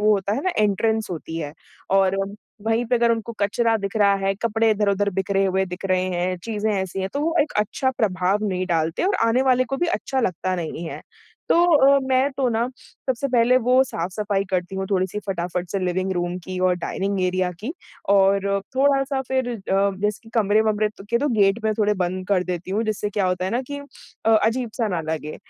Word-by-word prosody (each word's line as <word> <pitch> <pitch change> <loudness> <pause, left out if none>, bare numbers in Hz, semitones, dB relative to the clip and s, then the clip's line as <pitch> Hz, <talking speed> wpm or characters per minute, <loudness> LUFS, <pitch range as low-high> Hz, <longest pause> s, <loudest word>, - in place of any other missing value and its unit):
वो 215 0 +4
होता 200 0 0
है 260 - -2
ना 370 - +1
एंट्रेंस 215 +1 +1
होती 165 -1 -5
है। 145 -3 -5 0.4
और 195 0 +3 0.5
वहीं 225 +2 +2
पे 245 - +1
अगर 235 0 +3
उनको 230 +1 -3
कचरा 225 +3 +2
दिख 200 +1 -4
रहा 200 -1 +4
है, 195 0 0
कपड़े 225 +2 +1
इधर-उधर 205 -1 +1
बिखरे 195 +1 0
हुए 190 0 +1
दिख 180 +1 -8
रहे 185 0 +2
हैं, 180 +1 -1
चीज़ें 220 -1 -1
ऐसी 190 -1 -2
हैं 190 - -2
तो 285 - -2
वो 325 +2 0
एक 295 - -6
अच्छा 215 +5 0
प्रभाव 205 -3 0
नहीं 185 -1 -2
डालते 165 - 0
और 395 +2 +2
आने 245 +3 +3
वाले 255 -1 +3
को 270 +2 -3
भी 350 - 0
अच्छा 275 -5 -1
लगता 185 -3 -1
नहीं 165 -1 -4
है। - - -7 0.5
तो - - +5 0.4
अ, - - +4
मैं 260 +1 +2
तो 265 -1 0
ना 230 +1 0
सबसे 260 +1 -4
पहले 245 0 +4
वो 255 +2 +4
साफ़-सफ़ाई 195 -1 -2
करती 180 0 -1
हूँ 190 - -2
थोड़ी-सी 190 +1 0
फटाफट 180 -1 -3
से 195 - -1
लिविंग 185 +1 -1
रूम 175 0 -2
की 185 0 -5
और 180 - +3
डाइनिंग 195 +2 -2
एरिया 185 0 +1
की 245 +9 -4 0.4
और 195 0 +4 0.3
थोड़ा-सा 275 0 +2
फिर 260 -1 0
अ, 195 -3 0
जैसे 210 +2 -2
कमरे-वमरे 215 0 +2
त 210 -1 -14
के 235 - +3
तो 290 - 0
गेट 195 +2 +4
मैं 220 - +2
थोड़े 210 -1 +2
बंद 185 +1 -4
कर 190 -3 +2
देती 180 0 -4
हूँ 210 +4 0
जिससे 210 -1 -2
क्या 200 -2 0
होता 180 0 -1
है 190 - -1
ना 240 - 0
कि 285 - -3 0.5
अ, 225 - +4
अजीब-सा 230 0 0
ना 180 -4 -1
लगे। 155 -1 -4
205 Hz, 210 wpm, -23 LUFS, 185-230 Hz, 0.5 s, तो